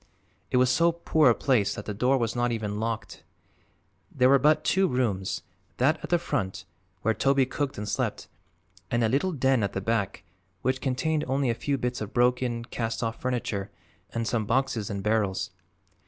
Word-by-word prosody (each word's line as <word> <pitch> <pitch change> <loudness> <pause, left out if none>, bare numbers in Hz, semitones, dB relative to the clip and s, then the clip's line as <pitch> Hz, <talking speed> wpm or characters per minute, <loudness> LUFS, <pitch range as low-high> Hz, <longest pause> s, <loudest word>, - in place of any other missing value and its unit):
It - - +2
was 125 0 +4
so 170 +5 +4
poor 160 -4 +3
a 115 - +4
place 120 -7 +1
that 105 - -7
the 105 - -3
door 125 +6 +2
was 115 -2 -1
not 120 0 +1
even 105 -2 -3
locked. 115 0 -4 0.9
There 125 -1 +3
were 140 0 +6
but 150 +2 +4
two 190 0 +3
rooms; 110 - -1 0.3
that 155 +6 +3
at - - -6
the 175 - +4
front, 110 - -3 0.4
where 110 - +3
Toby 135 +4 +3
cooked 140 +1 -3
and 105 0 -4
slept, 105 - -2 0.6
and 120 0 +1
a - - +4
little 145 +10 +1
den 135 -5 +2
at 100 - -1
the - - -1
back, 105 -1 -1 0.4
which 130 0 0
contained 150 +3 0
only 135 -1 +1
a - - +1
few 140 +4 -1
bits 125 -2 -2
of 105 0 -5
broken, 120 -1 +1
cast 115 0 -3
off 115 0 -3
furniture 115 -6 -2 0.4
and 115 -1 -2
some 110 -3 -1
boxes 120 -4 0
and 100 -2 -4
barrels. 105 -3 0
120 Hz, 185 wpm, -27 LUFS, 110-135 Hz, 0.9 s, were